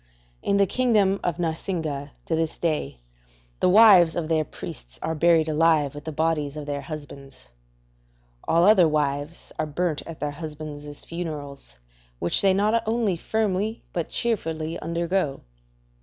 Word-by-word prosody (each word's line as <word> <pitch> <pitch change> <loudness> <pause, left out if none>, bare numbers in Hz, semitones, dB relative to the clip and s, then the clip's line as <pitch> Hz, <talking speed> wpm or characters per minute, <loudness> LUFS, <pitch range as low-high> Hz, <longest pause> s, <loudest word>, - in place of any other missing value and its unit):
In 200 - +1
the 200 - +5
kingdom 205 -3 +2
of 170 -2 -1
Narsingah 160 -4 -3 0.2
to 165 - 0
this 160 0 -1
day 155 - -2 0.6
the - - +3
wives 190 -5 +7
of 165 -2 -2
their 160 -1 +2
priests - - -10
are 160 - -1
buried 160 0 +3
alive 155 -2 +3
with 145 0 -9
the 160 - -4
bodies 155 -2 -1
of 150 - -5
their 145 -1 -3
husbands; 140 - -10 1.0
all 165 +1 +4
other 190 -3 +6
wives 150 +1 -2
are 155 - 0
burnt 155 +1 -1
at 165 -2 -8
their 150 - -2
husbands' 150 -1 -8
funerals, 150 - -7 0.4
which 85 +7 +2
they 195 - +5
not 210 +4 +2
only 220 -4 +1
firmly 215 +3 -1
but 170 -2 -2
cheerfully 165 -8 -2
undergo. 170 -2 -1
160 Hz, 145 wpm, -25 LUFS, 150-180 Hz, 1.0 s, wives